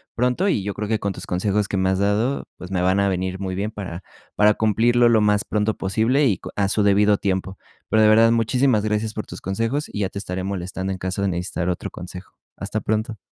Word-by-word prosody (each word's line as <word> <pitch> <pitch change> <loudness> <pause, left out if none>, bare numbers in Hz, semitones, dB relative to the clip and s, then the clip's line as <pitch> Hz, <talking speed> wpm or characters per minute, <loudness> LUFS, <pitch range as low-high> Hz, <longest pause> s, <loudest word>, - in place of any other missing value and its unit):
pronto 125 - +1
y 105 - 0
yo 100 +1 -3
creo 105 +1 -4
que 110 +1 +1
con 100 -1 -2
tus - - -8
consejos 100 +3 0
que 100 - -2
me 95 0 +2
has 95 0 0
dado, 105 +7 0
pues, 90 - -9
me 90 -2 0
van 95 +2 +2
a 100 0 +2
venir 95 0 -2
muy 95 -1 -3
bien 100 +3 -2
para 95 -5 -7 0.3
para 105 0 +4
cumplirlo 120 +3 +3
lo 115 -2 +4
más 105 0 +2
pronto 105 0 0
posible 110 +9 +1
y 100 -9 +1
con - - -9
a 100 -1 +1
su 105 +2 +1
debido 105 0 +4
tiempo, 95 -1 -2 0.3
pero, 110 - +3
de 110 - +6
verdad, 115 +1 +6
muchísimas 115 0 +2
gracias 105 0 -1
por 110 - -5
tus - - -8
consejos 115 +9 -2
y - - -6
ya 100 -2 0
te - - -9
estaré 95 -2 -4
molestando 95 0 -4
en 95 - -3
caso 95 +1 -3
de 100 - +1
necesitar 90 -1 -2
otro 90 - -3
consejo, 90 +1 -10 0.2
hasta 100 +2 -4
pronto. 110 +2 -2
100 Hz, 240 wpm, -22 LUFS, 95-110 Hz, 0.3 s, de